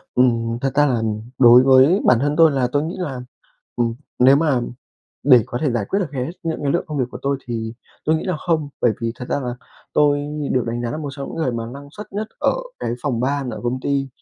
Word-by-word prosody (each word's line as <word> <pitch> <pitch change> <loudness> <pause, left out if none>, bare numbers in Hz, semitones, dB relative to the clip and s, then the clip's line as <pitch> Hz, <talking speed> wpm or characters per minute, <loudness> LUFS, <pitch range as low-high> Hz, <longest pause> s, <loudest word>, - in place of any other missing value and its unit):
Ừm, 115 -2 +2
thật 135 - 0
ra 145 +1 +4
nà 125 -5 +1 0.4
đối 125 0 +8
với 135 +8 +5
bản 125 - +5
thân 145 +2 +1
tôi 165 -1 +6
là 135 -3 0
tôi 145 - +2
nghĩ 160 +3 -4
là, 145 -9 -4 0.6
ừm, 115 -1 0 0.2
nếu 130 +2 +6
mà 145 -4 +2 0.6
để 130 -4 +6
có 120 - -4
thể 150 - +2
giải 120 -4 -1
quyết 195 - +1
được 175 -6 -3
hết 130 +1 -3
những 165 -2 -3
cái 140 -1 +1
lượng 175 - 0
công 150 -2 -4
việc 130 - +2
của - - -7
tôi, 140 0 0
thì 115 -2 -4 0.3
tôi 155 +1 +3
nghĩ 160 - -4
là 185 -4 -1
không. 160 -4 -1
Bởi 120 - +3
vì 115 -1 -2
thật 125 - -7
ra - - 0
là 125 -2 -3 0.4
tôi 145 -1 +3 0.3
được 125 -2 +1
đánh 120 +1 -3
giá 120 - -2
là - - -3
một 150 -2 -4
trong 140 -1 -6
những - - -7
người 160 -6 0
mà 115 -1 -4
năng 140 +4 -9
suất 210 +7 -10
nhất 210 +2 -3
ở - - +3 0.3
cái - - -2
phòng 125 -6 -1
ban 135 0 -1
ở - - -6
công 125 +2 -2
ty, 140 0 -1
135 Hz, 255 wpm, -21 LUFS, 120-150 Hz, 0.6 s, đối